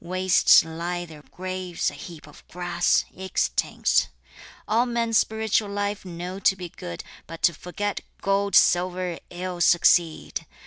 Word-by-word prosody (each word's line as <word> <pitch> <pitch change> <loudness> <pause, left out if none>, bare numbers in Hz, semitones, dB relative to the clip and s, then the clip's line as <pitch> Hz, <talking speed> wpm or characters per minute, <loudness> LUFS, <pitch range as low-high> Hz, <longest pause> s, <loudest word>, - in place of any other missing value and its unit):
Waste 185 -1 +4
lie 170 +2 -4
their 155 -3 -13
graves, 185 -1 -3
a - - -14
heap 165 -5 -10
of 150 - -16
grass, 175 0 0
extinct. 190 0 0 0.6
All 230 +4 +2
men 235 -1 -1
spiritual 220 -1 +1
life 205 0 -3
know 180 +2 -6
to 190 - +3
be 180 -2 -7
good, 85 - -8 0.2
But 165 0 -10
to 170 - +4
forget 200 +5 -4 0.2
gold, 200 +1 0
silver, 180 -1 +3
ill 180 0 -5
succeed! 170 -1 +2
180 Hz, 135 wpm, -24 LUFS, 175-200 Hz, 0.6 s, Waste